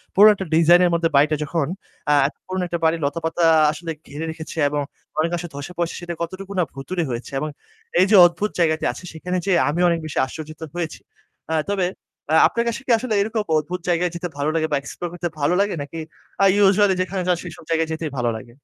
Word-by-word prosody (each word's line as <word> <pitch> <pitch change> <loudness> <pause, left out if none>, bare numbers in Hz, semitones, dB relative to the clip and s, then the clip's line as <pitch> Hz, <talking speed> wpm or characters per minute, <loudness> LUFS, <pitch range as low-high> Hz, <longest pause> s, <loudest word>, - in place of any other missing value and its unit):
পুরনো 210 +2 +9
একটা 190 -1 -5
designer 170 +2 +6
এর - - -1
মধ্যে 165 -1 +1
বাড়িটা 150 +2 +4
যখন, 155 -2 -1 0.4
আ - - +6
এত 150 - -9
পুরনো 185 0 -2
একটা 170 -1 -3
বাড়ি 160 +1 +3
লতাপাতা 165 +3 -1 0.3
আসলে 165 +2 -6 0.2
ঘিরে 150 +3 -5
রেখেছে 160 +1 -9
এবং 145 0 -1 0.4
অনেক 160 +2 +2
অংশ 175 0 -4
ধসে 145 +5 -7
পড়সে 170 -1 -1
সেটা 175 0 -5
কতটুকু 190 +3 -5
না - - +4
ভূতুড়ে 170 +6 -3
হয়েছে। 120 +2 -5
এবং 155 +2 -3 0.5
এই 185 - +6
যে 215 - +5
অদ্ভুত 180 +5 0
জায়গাটি 160 -2 +2
আছে - - -11
সেখানে 180 +3 -3
যেয়ে 180 -4 +3
আমিও 175 +4 +2
অনেক 170 -1 +1
বেশি 155 - -6
আশ্চর্যজিত 155 +3 -9 0.2
হয়েছি। 170 -3 -4 0.5
আ - - +2 0.2
তবে 190 -3 +1 0.5
আ - - +6
আপনার 235 0 -1
কাছে 235 +3 -4
কি - - 0
আসলে 240 -1 -2
এরকম 220 +2 -1 0.2
অদ্ভুত 175 +4 -3
জায়গায় 175 0 +1
যেতে 175 +1 -3
ভালো 145 +2 0
লাগে 160 -1 +1
বা - - +3
explore 170 +5 -6
করতে 175 0 -3
ভালো 145 +4 +2
লাগে 200 -2 0
নাকি 145 +3 -7 0.4
আ - - +7 0.2
usually 195 0 +4
যেখানে 185 +1 -2
যান 180 -2 +3
সেসব 175 - -9
জায়গায় 165 -1 +1
যেতেই 160 -1 -3
ভালো 120 -1 +1
লাগে? 110 +2 -9
170 Hz, 215 wpm, -22 LUFS, 155-180 Hz, 0.5 s, পুরনো